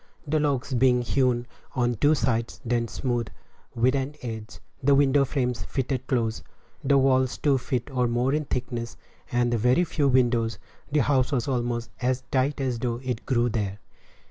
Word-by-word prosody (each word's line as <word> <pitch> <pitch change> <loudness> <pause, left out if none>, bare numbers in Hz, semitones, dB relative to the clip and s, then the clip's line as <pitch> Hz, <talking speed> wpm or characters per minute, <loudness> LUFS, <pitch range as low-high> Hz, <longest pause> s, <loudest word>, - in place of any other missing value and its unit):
The 155 +1 +1
logs 140 -3 0
being 125 0 +3
hewn 125 -1 +1 0.3
on 120 -2 +1
two 145 +7 +3
sides, 115 -3 -1
then 120 0 0
smoothed 120 -1 -2 0.5
with 125 +2 +3
an 140 +1 -2
adze, 110 -3 -6 0.2
the 140 +1 +4
window 140 0 +4
frames 125 -3 -1
fitted 130 -1 -3
close, 115 -4 0 0.4
the 140 +1 +4
walls 130 -1 +3
two 140 -3 +2
feet 125 -1 -2
or 125 -2 +1
more 120 +3 +1
in 150 0 0
thickness, 120 -3 -4 0.3
and 120 0 +1
very 125 +8 +3
few 150 -4 0
windows, 120 -4 +2 0.3
the 150 0 +3
house 130 -2 +2
was 125 -3 0
almost 120 -2 -2
as 130 +1 0
tight 135 +2 +1
as 130 -3 -1
though 120 -1 -2
it 125 -3 -4
grew 120 -2 +2
there. 105 -4 -2
125 Hz, 170 wpm, -26 LUFS, 120-135 Hz, 0.5 s, the